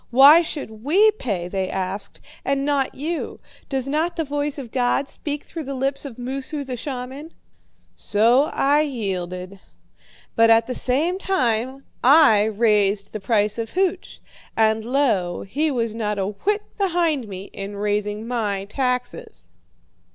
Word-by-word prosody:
'Why 280 Hz, +7 st, +8 dB
should 225 Hz, -10 st, -6 dB
we 395 Hz, +10 st, +5 dB
pay,' 205 Hz, -, -3 dB
they 190 Hz, 0 st, -2 dB
asked, 190 Hz, +1 st, -4 dB, 0.2 s
'and 275 Hz, 0 st, 0 dB
not 285 Hz, -2 st, 0 dB
you? 320 Hz, +4 st, -4 dB, 0.3 s
Does 270 Hz, -2 st, -2 dB
not 315 Hz, +5 st, 0 dB
the 330 Hz, -, -1 dB
voice 290 Hz, 0 st, -2 dB
of 255 Hz, -5 st, -7 dB
God 255 Hz, +2 st, +1 dB
speak 295 Hz, 0 st, -5 dB
through 320 Hz, -3 st, -7 dB
the 275 Hz, +1 st, -4 dB
lips 275 Hz, +2 st, -1 dB
of 260 Hz, -5 st, -8 dB
Moosu, 270 Hz, +4 st, -4 dB
the 260 Hz, -2 st, -5 dB
shaman?' 265 Hz, +4 st, -6 dB, 0.6 s
So 230 Hz, +6 st, +3 dB
I 290 Hz, +2 st, +3 dB
yielded. 190 Hz, -, -4 dB, 0.8 s
But 230 Hz, 0 st, +5 dB
at 225 Hz, 0 st, +5 dB
the 255 Hz, -, -4 dB
same 310 Hz, +10 st, 0 dB
time 260 Hz, -, 0 dB, 0.2 s
I 255 Hz, -7 st, +6 dB
raised 210 Hz, -2 st, +1 dB
the 215 Hz, -, -4 dB
price 210 Hz, +1 st, +1 dB
of 225 Hz, -1 st, -4 dB
hooch, 375 Hz, 0 st, -1 dB, 0.4 s
and 220 Hz, 0 st, +3 dB
lo, 230 Hz, -9 st, 0 dB
he 295 Hz, +10 st, -1 dB
was 230 Hz, -5 st, -1 dB
not 210 Hz, -2 st, -2 dB
a 195 Hz, -, 0 dB
whit 415 Hz, -, -1 dB, 0.2 s
behind 335 Hz, -, +1 dB
me 195 Hz, 0 st, -8 dB
in 200 Hz, 0 st, -6 dB
raising 210 Hz, +1 st, -2 dB
my 210 Hz, -5 st, -2 dB
taxes. 250 Hz, -, -3 dB
250 Hz, 150 wpm, -22 LUFS, 210-290 Hz, 0.8 s, Why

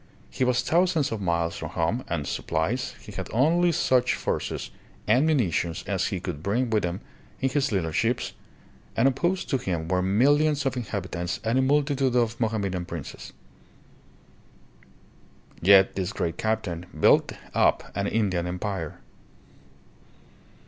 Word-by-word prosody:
He -, -, -1 dB
was 125 Hz, -1 st, +2 dB
thousands 170 Hz, -5 st, +2 dB
of 110 Hz, -2 st, -3 dB
miles 85 Hz, -2 st, 0 dB
from 80 Hz, -, -5 dB
home 85 Hz, +9 st, -1 dB
and 80 Hz, -4 st, -2 dB
supplies, 80 Hz, -, -2 dB
he -, -, -11 dB
had -, -, -6 dB
only 170 Hz, +8 st, +3 dB
such 130 Hz, -5 st, +2 dB
forces -, -, -3 dB, 0.3 s
and 125 Hz, +8 st, +4 dB
munitions 95 Hz, -, 0 dB
as 95 Hz, -2 st, 0 dB
he 95 Hz, -, -2 dB
could 85 Hz, -5 st, -5 dB
bring 115 Hz, +7 st, 0 dB
with 110 Hz, -2 st, +2 dB
him 90 Hz, +3 st, -3 dB, 0.4 s
in 135 Hz, -, +1 dB
his 140 Hz, 0 st, 0 dB
little 90 Hz, -6 st, 0 dB
ships, 115 Hz, +9 st, 0 dB, 0.6 s
and 115 Hz, -, +5 dB
opposed 175 Hz, +8 st, 0 dB
to 135 Hz, -, +2 dB
him 85 Hz, -7 st, -3 dB
were 90 Hz, +1 st, +1 dB
millions 140 Hz, +9 st, +3 dB
of 135 Hz, -, 0 dB
inhabitants 90 Hz, -6 st, -3 dB
and 115 Hz, +3 st, +1 dB
a -, -, +4 dB
multitude 140 Hz, -2 st, +2 dB
of 115 Hz, -2 st, +1 dB
Mo 115 Hz, -, +2 dB
hammedan 100 Hz, -5 st, -2 dB
princes. 85 Hz, -5 st, -8 dB, 2.3 s
Yet 95 Hz, +2 st, +6 dB
this 95 Hz, 0 st, -2 dB
great 85 Hz, 0 st, -2 dB
captain 100 Hz, -6 st, -2 dB
built -, -, +4 dB, 0.2 s
up -, -, +2 dB
an 100 Hz, 0 st, -1 dB
Indian 95 Hz, -6 st, 0 dB
empire. 90 Hz, -2 st, -4 dB
105 Hz, 145 wpm, -26 LUFS, 90-130 Hz, 2.3 s, Yet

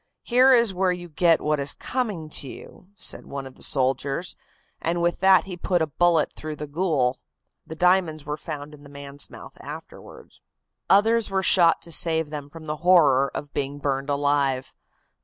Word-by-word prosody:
'Here 255 Hz, +2 st, +4 dB
is 235 Hz, -5 st, +4 dB
where 185 Hz, 0 st, +1 dB
you 175 Hz, -1 st, -6 dB
get 165 Hz, +1 st, +3 dB
what 150 Hz, -1 st, 0 dB
is 140 Hz, +1 st, -1 dB
coming 210 Hz, -11 st, -3 dB
to 140 Hz, -, 0 dB
you,' 180 Hz, -, -13 dB
said -, -, -3 dB
one 140 Hz, -1 st, -6 dB
of 130 Hz, -, -10 dB
the -, -, -20 dB
soldiers, 135 Hz, +5 st, 0 dB, 0.5 s
and 170 Hz, +1 st, -1 dB
with 175 Hz, 0 st, 0 dB
that 190 Hz, 0 st, +5 dB
he 190 Hz, -2 st, -7 dB
put 175 Hz, 0 st, 0 dB
a -, -, +1 dB
bullet 165 Hz, +1 st, +1 dB
through 155 Hz, 0 st, -7 dB
the 150 Hz, -, -6 dB
ghoul. 145 Hz, -5 st, 0 dB, 0.5 s
The 160 Hz, -, -7 dB
diamonds 175 Hz, -3 st, +1 dB
were 150 Hz, 0 st, -3 dB
found 150 Hz, -1 st, -7 dB
in 150 Hz, -, -14 dB
the 145 Hz, -, -14 dB
man's 140 Hz, 0 st, -9 dB
mouth -, -, -12 dB
afterward." -, -, -11 dB, 0.5 s
Others 225 Hz, +3 st, +4 dB
were 190 Hz, -1 st, -1 dB
shot 170 Hz, -3 st, +4 dB
to 170 Hz, -, -5 dB
save 160 Hz, -2 st, +2 dB
them 145 Hz, -2 st, -6 dB
from 160 Hz, +1 st, -12 dB
the 150 Hz, 0 st, -4 dB
horror 150 Hz, -6 st, +4 dB
of 145 Hz, -, -6 dB
being 140 Hz, +1 st, -3 dB
burned 140 Hz, -1 st, -2 dB
alive. 140 Hz, -2 st, 0 dB
155 Hz, 185 wpm, -24 LUFS, 140-180 Hz, 0.5 s, that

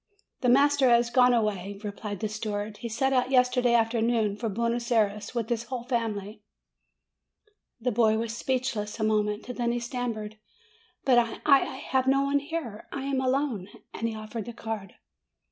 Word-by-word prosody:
'The 250 Hz, -, +1 dB
master 280 Hz, +1 st, +5 dB
has 235 Hz, 0 st, +4 dB
gone 250 Hz, 0 st, +5 dB
away," 205 Hz, -4 st, -1 dB
replied 205 Hz, 0 st, -5 dB
the 215 Hz, -, 0 dB
steward; 210 Hz, -1 st, -4 dB
"he 235 Hz, -, -6 dB
set 265 Hz, +4 st, 0 dB
out 255 Hz, -1 st, +2 dB
yesterday 250 Hz, -2 st, +3 dB
afternoon 225 Hz, -2 st, +2 dB
for 225 Hz, +1 st, -3 dB
Buenos 235 Hz, +3 st, -1 dB
Ay 225 Hz, -2 st, +6 dB
res, 210 Hz, +3 st, -6 dB
with 230 Hz, -2 st, -1 dB
his 235 Hz, -1 st, -1 dB
whole 245 Hz, -1 st, -5 dB
family." 220 Hz, -4 st, -3 dB, 1.4 s
The 250 Hz, +2 st, 0 dB
boy 220 Hz, -1 st, +3 dB
was 225 Hz, 0 st, -3 dB
speechless 240 Hz, -4 st, -2 dB
a -, -, 0 dB
moment. 210 Hz, 0 st, +1 dB
Then 240 Hz, -1 st, 0 dB
he 240 Hz, -, -1 dB
stammered, 235 Hz, -3 st, -4 dB, 0.7 s
"But 250 Hz, -3 st, +6 dB
I 230 Hz, -1 st, -2 dB
I 275 Hz, -2 st, +6 dB
have 260 Hz, -1 st, -1 dB
no 275 Hz, +1 st, +4 dB
one 280 Hz, +1 st, +2 dB
here! 285 Hz, -8 st, -6 dB
I 275 Hz, -, -4 dB
am 270 Hz, -1 st, 0 dB
alone 260 Hz, -7 st, 0 dB
!" -, -, -44 dB
and 230 Hz, -, -2 dB
he 225 Hz, -, -5 dB
offered 215 Hz, 0 st, -6 dB
the 240 Hz, -, -7 dB
card. 220 Hz, -3 st, -6 dB
235 Hz, 180 wpm, -27 LUFS, 215-250 Hz, 1.4 s, Ay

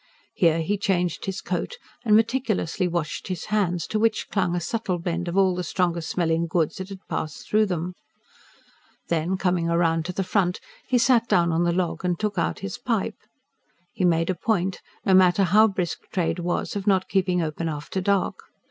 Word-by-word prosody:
Here 165 Hz, -3 st, +3 dB
he 200 Hz, +5 st, -1 dB
changed 180 Hz, -4 st, 0 dB
his 190 Hz, -2 st, -3 dB
coat 185 Hz, -, -3 dB, 0.3 s
and 215 Hz, -3 st, +4 dB
meticulously 220 Hz, -6 st, +1 dB
washed 170 Hz, -3 st, -3 dB
his 185 Hz, -3 st, -4 dB
hands, 180 Hz, -5 st, +1 dB
to 215 Hz, -, -2 dB
which 220 Hz, 0 st, +1 dB
clung 180 Hz, -4 st, +1 dB
a -, -, 0 dB
subtle 185 Hz, +1 st, -2 dB
blend 175 Hz, 0 st, -3 dB
of 170 Hz, +2 st, -2 dB
all 190 Hz, -1 st, +4 dB
the 180 Hz, 0 st, -3 dB
strong 175 Hz, 0 st, 0 dB
smelling 165 Hz, 0 st, 0 dB
goods 165 Hz, -2 st, 0 dB
that 190 Hz, +1 st, -6 dB
had 195 Hz, -1 st, -10 dB
passed 155 Hz, -2 st, -4 dB
through 215 Hz, 0 st, +3 dB
them. 180 Hz, -1 st, -3 dB, 1.2 s
Then, 170 Hz, +3 st, 0 dB
coming 180 Hz, -3 st, +1 dB
round 165 Hz, -1 st, +2 dB
to 180 Hz, -, -3 dB
the 195 Hz, -, -1 dB
front, 180 Hz, -1 st, 0 dB, 0.3 s
he 255 Hz, -, +3 dB
sat 235 Hz, -1 st, +4 dB
down 170 Hz, -5 st, +3 dB
on 165 Hz, +2 st, +1 dB
the 170 Hz, -, +2 dB
log 175 Hz, 0 st, -1 dB
and 180 Hz, -2 st, 0 dB
took 210 Hz, -3 st, -1 dB
out 170 Hz, -, -1 dB
his 95 Hz, -, -5 dB
pipe. -, -, -1 dB, 0.7 s
He -, -, -2 dB
made 165 Hz, 0 st, +3 dB
a -, -, 0 dB
point, 190 Hz, -1 st, -1 dB, 0.2 s
no 195 Hz, -, +4 dB
matter 185 Hz, +1 st, +5 dB
how 210 Hz, +5 st, +5 dB
brisk 185 Hz, -5 st, -3 dB
trade 175 Hz, -1 st, 0 dB
was, 175 Hz, +3 st, -2 dB
of 200 Hz, 0 st, -4 dB
not 190 Hz, -2 st, +3 dB
keeping 180 Hz, -2 st, +1 dB
open 160 Hz, +1 st, -3 dB
after 150 Hz, +5 st, -4 dB
dark. 200 Hz, 0 st, 0 dB
180 Hz, 190 wpm, -24 LUFS, 170-195 Hz, 1.2 s, matter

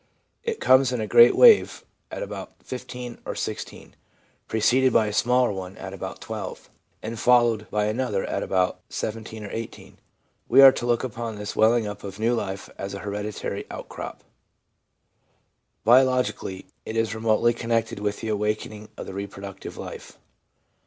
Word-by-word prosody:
It 460 Hz, -1 st, -3 dB
comes 130 Hz, -1 st, +5 dB
in 125 Hz, -, -2 dB
a 110 Hz, -, -1 dB
great 120 Hz, +3 st, +7 dB
wave 465 Hz, -4 st, +6 dB, 0.2 s
at -, -, -5 dB
about -, -, -7 dB
15 125 Hz, -1 st, -7 dB
or -, -, -5 dB
16, -, -, -6 dB, 0.5 s
preceded 130 Hz, +4 st, +3 dB
by 115 Hz, -1 st, +4 dB
a 105 Hz, -, -3 dB
smaller 125 Hz, +2 st, +3 dB
one 95 Hz, -1 st, -7 dB
at 95 Hz, 0 st, -7 dB
about 95 Hz, -, -7 dB
12, -, -, -7 dB, 0.3 s
and 115 Hz, +1 st, -5 dB
followed 120 Hz, -3 st, +3 dB
by 105 Hz, 0 st, 0 dB
another 105 Hz, -2 st, -1 dB
at -, -, -2 dB
about 90 Hz, -1 st, 0 dB
17 110 Hz, 0 st, -5 dB
or 100 Hz, -, -7 dB
18. 115 Hz, 0 st, -8 dB, 0.5 s
We 130 Hz, -, +6 dB
are 135 Hz, -, +11 dB
to 120 Hz, -, -4 dB
look 120 Hz, 0 st, +1 dB
upon 115 Hz, -2 st, -4 dB
this 105 Hz, 0 st, -6 dB
welling 115 Hz, +1 st, +4 dB
up 105 Hz, -1 st, -6 dB
of 100 Hz, -1 st, -7 dB
new 115 Hz, +2 st, +1 dB
life 95 Hz, -4 st, -3 dB
as 100 Hz, 0 st, -5 dB
a -, -, -6 dB
hereditary 105 Hz, +1 st, -4 dB
outcrop. -, -, -8 dB, 1.6 s
Biologic 125 Hz, -2 st, +4 dB
ally, 95 Hz, -1 st, -6 dB, 0.2 s
it 110 Hz, -, -5 dB
is 115 Hz, 0 st, +1 dB
remotely 110 Hz, +1 st, +2 dB
connected 115 Hz, -2 st, -1 dB
with 105 Hz, 0 st, -2 dB
the 110 Hz, -, -4 dB
awakening 105 Hz, 0 st, -2 dB
of -, -, -6 dB
the -, -, -8 dB
reproductive 100 Hz, 0 st, -7 dB
life. -, -, -9 dB
110 Hz, 160 wpm, -25 LUFS, 105-120 Hz, 1.6 s, are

